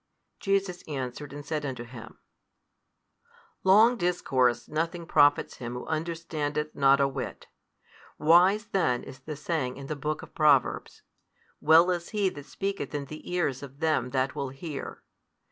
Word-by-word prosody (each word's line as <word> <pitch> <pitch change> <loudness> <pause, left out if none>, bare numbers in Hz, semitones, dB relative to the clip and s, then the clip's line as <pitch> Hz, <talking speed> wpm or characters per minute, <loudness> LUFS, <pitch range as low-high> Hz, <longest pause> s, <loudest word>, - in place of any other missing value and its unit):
Jesus 195 -3 0
answered 140 -1 -5
and 145 0 -8
said 155 -2 -2
unto 130 -4 -4
him, 115 -2 -11 1.5
Long 220 +6 +6
discourse 135 - +1
nothing 165 +2 -2
profits 145 -2 +3
him 120 -1 -6
who 125 - -6
understandeth 155 -2 -3
not 140 0 +4
a 140 - +4
whit. 135 -1 -6 0.7
Wise 180 +7 +5
then 170 - 0
is 135 - -10
the 150 +3 -7
saying 145 -4 -2
in 140 - -8
the 155 - -4
book 150 +2 -3
of - - -13
Proverbs, 145 -4 +2 0.6
Well 165 +4 +6
is 175 -1 -3
he 205 -3 +1
that 145 -4 -11
speaketh 195 -8 -4
in 145 -1 -3
the 155 +4 -9
ears 170 -8 0
of 140 0 -11
them 155 -5 +1
that 130 0 0
will 140 - -3
hear. 140 +2 -7
150 Hz, 150 wpm, -28 LUFS, 135-170 Hz, 1.5 s, Long